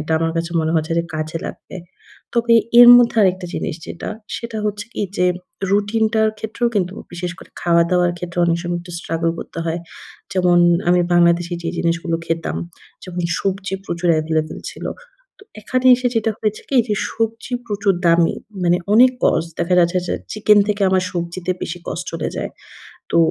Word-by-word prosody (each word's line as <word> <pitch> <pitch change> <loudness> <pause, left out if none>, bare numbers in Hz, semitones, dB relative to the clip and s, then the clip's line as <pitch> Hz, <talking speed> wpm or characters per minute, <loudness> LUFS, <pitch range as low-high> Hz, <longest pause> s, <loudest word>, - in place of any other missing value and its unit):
এটা 155 +1 -3
আমার 165 0 0
কাছে 170 +1 -2
মনে 160 0 -1
হয়েছে 160 +1 0
যে - - +1
কাজে 155 +1 -3
লাগবে। - - -9 0.6
তবে 235 0 +3 0.3
এর 240 - +10
মধ্যে 240 -1 +4
আরেকটা 185 -1 +1
জিনিস - - -3
যেটা, 170 - -6 0.3
সেটা 230 -2 -5
হচ্ছে 205 0 -3
কি - - -2
যেম 180 0 +2 0.4
রুটিনটার 220 +2 +2
ক্ষেত্রেও 220 +3 -1
কিন্তু 185 -2 0 0.2
বিশেষ 175 0 -4
করে - - -14
খাওয়া-দাওয়ার 175 +1 +2
ক্ষেত্রেও 175 0 -2
অনেক 170 0 +1
সময় 175 0 -2
একটু 175 0 -11
struggle 165 0 -1
করতে - - -8
হয়। 165 +1 -2 0.5
যেমন, 180 -2 +3 0.3
আমি 180 0 +4
বাংলাদেশে 175 0 +3
যেই 165 +1 -3
জিনিসগুলো 165 0 0
খেতাম, 165 0 -2 0.5
যেমন 180 -1 -5 0.2
সবজি 195 0 -2
প্রচুর 170 -1 -2
available 155 0 -2
ছিল। - - -8 0.5
তো - - -16 0.2
এখানে 255 +4 -1
এসে 250 0 0
যেটা 225 0 +1
হয়েছে 215 -1 -2
কি 270 - +1
যে, 210 - +1 0.2
সবজি 225 +2 -3
প্রচুর 205 -2 +1
দামি। 170 0 +4 0.3
মানে 175 0 +4 0.2
অনেক 250 +3 +7
cost 160 - +3 0.2
দেখা 175 +1 +1
যাচ্ছে 175 +1 +2
যে - - 0 0.2
চিকেন 210 0 +4
থেকে 205 -1 0
আমার 185 -1 +2
সবজিতে 175 +1 -4
বেশি 175 +1 -4
কস্ট - - -4
চলে - - -2
যায়। - - -3 0.6
তো - - +2
180 Hz, 170 wpm, -19 LUFS, 170-210 Hz, 0.6 s, এর